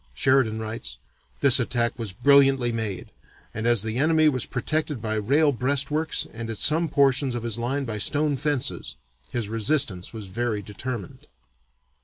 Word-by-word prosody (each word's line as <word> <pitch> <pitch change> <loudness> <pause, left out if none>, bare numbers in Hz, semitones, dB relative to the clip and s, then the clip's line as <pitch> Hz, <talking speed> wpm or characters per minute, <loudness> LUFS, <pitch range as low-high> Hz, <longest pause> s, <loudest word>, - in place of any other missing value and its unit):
Sheridan 130 - +2
writes: 110 +1 -5 0.4
"This - - +7
attack 120 0 -1
was 110 -4 -4
brilliantly 135 +2 +4
made, 110 -5 -4 0.4
and 110 +2 -3
as 120 -4 +4
the 110 +1 -3
enemy 155 +2 +4
was 130 -5 -2
protected 150 +2 -2
by 110 0 -3
rail 140 +8 +2
breastworks 140 +4 -1
and 115 0 -6
at 110 - -5
some 160 +6 +2
portions 135 -2 +2
of 120 - -4
his 115 -1 -2
line 135 +4 -2
by 110 -3 -4
stone 145 +7 +2
fences, 145 -1 -2 0.3
his 120 -4 -3
resistance 115 -4 -1
was 110 -3 -8
very 105 +1 -3
determined." 105 0 -7
120 Hz, 155 wpm, -24 LUFS, 110-140 Hz, 0.4 s, This